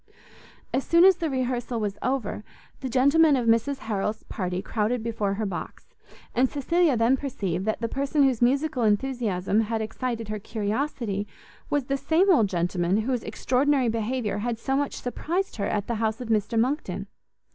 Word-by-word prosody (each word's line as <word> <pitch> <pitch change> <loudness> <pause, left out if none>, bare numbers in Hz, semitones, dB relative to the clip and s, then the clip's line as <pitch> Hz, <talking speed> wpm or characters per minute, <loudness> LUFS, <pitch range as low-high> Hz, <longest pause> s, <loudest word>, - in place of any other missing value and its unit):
As 265 - +1
soon 335 +2 +5
as 380 -2 +6
the 330 -3 -1
rehearsal 250 -3 -2
was 205 -2 -3
over, 250 -5 -2 0.4
the 260 - -4
gentlemen 280 +5 +5
of 250 -3 0
Mrs 230 +5 +2
Harrel's 215 0 -2
party 180 -3 -3
crowded 220 +3 -1
before 215 -4 -1
her 215 +1 -2
box; 190 -3 -6 0.5
and 255 +1 +3
Cecilia 310 0 +2
then 230 +3 +4
perceived 195 -10 -3
that 220 +2 -1
the 230 - 0
person 280 +4 +1
whose 260 -4 +2
musical 270 +2 +2
enthusiasm 215 -3 +1
had 225 +1 -1
excited 230 0 -3
her 215 0 -3
curiosity, 215 0 -2 0.4
was 290 -2 +1
the 275 +2 -1
same 345 +7 +3
old 220 - +3
gentleman 175 +1 0
whose 250 +1 -1
extraordinary 265 +1 +1
behaviour 225 -1 -1
had 235 +1 -2
so 270 +4 -1
much 285 0 -1
surprized 340 +9 -3
her 200 - -1
at 205 -1 -1
the 235 - -2
house 220 +1 0
of 245 -2 -6
Mr 225 +1 +1
Monckton. 225 - -1
235 Hz, 170 wpm, -26 LUFS, 210-270 Hz, 0.5 s, as